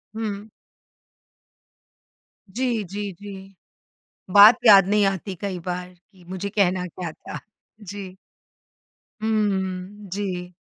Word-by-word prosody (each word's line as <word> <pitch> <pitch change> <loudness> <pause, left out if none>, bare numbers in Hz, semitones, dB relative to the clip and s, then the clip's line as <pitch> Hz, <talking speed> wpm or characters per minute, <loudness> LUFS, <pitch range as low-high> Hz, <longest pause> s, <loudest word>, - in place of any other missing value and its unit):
हुँ। 210 -2 -4 2.1
जी, 240 -3 0
जी, 200 +2 -5
जी, 195 -1 -10 0.8
बात 205 +3 +9
याद 195 -3 +8
नहीं 210 0 +3
आती 195 0 -2
कई 190 -3 -3
बार 180 0 -4
कि 180 +1 -24
मुझे 190 +2 -4
कहना 185 -3 +1
क्या 175 -1 -6
था? - - -9 0.4
जी। 195 -1 -8 1.1
हुँ, 205 -2 -2
जी। 180 -3 -4
195 Hz, 100 wpm, -23 LUFS, 185-205 Hz, 2.1 s, बात